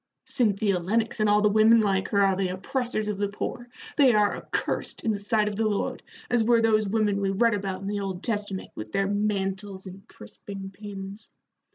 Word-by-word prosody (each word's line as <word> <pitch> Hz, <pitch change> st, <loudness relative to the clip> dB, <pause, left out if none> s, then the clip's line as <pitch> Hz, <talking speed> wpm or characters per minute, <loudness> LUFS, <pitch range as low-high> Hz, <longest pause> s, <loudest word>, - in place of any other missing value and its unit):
Cynthia 205 Hz, -5 st, +1 dB
Lennox 220 Hz, +6 st, -1 dB
and 215 Hz, -1 st, +3 dB
all 210 Hz, 0 st, +4 dB
the 210 Hz, -, +4 dB
women 220 Hz, +2 st, +6 dB
like 195 Hz, -3 st, +1 dB
her 200 Hz, -, +2 dB
are 195 Hz, -1 st, +3 dB
the 190 Hz, 0 st, 0 dB
oppressors 215 Hz, +4 st, -2 dB
of 210 Hz, -2 st, -3 dB
the 205 Hz, -1 st, 0 dB
poor. 240 Hz, +4 st, -5 dB, 0.3 s
They 265 Hz, -6 st, +6 dB
are 210 Hz, -1 st, +3 dB
accursed -, -, -2 dB
in 225 Hz, -, +1 dB
the 205 Hz, -, -2 dB
sight 210 Hz, +1 st, +1 dB
of 210 Hz, -, -2 dB
the 220 Hz, +1 st, +1 dB
Lord, 205 Hz, -2 st, -2 dB, 0.3 s
as 240 Hz, -2 st, +2 dB
were 235 Hz, +1 st, +4 dB
those 215 Hz, -2 st, +3 dB
women 205 Hz, -2 st, +1 dB
we 195 Hz, -, +1 dB
read 230 Hz, +4 st, +2 dB
about 195 Hz, -2 st, -3 dB
in 195 Hz, -, -5 dB
the 205 Hz, 0 st, -2 dB
Old 195 Hz, -2 st, -4 dB
Testament, 205 Hz, -4 st, -3 dB
with 110 Hz, 0 st, -8 dB
their 195 Hz, -, +1 dB
mantles 200 Hz, -1 st, -2 dB
and 190 Hz, +1 st, -11 dB
crisping 195 Hz, -, -9 dB
pins. 200 Hz, +1 st, -9 dB
205 Hz, 205 wpm, -26 LUFS, 195-215 Hz, 0.3 s, women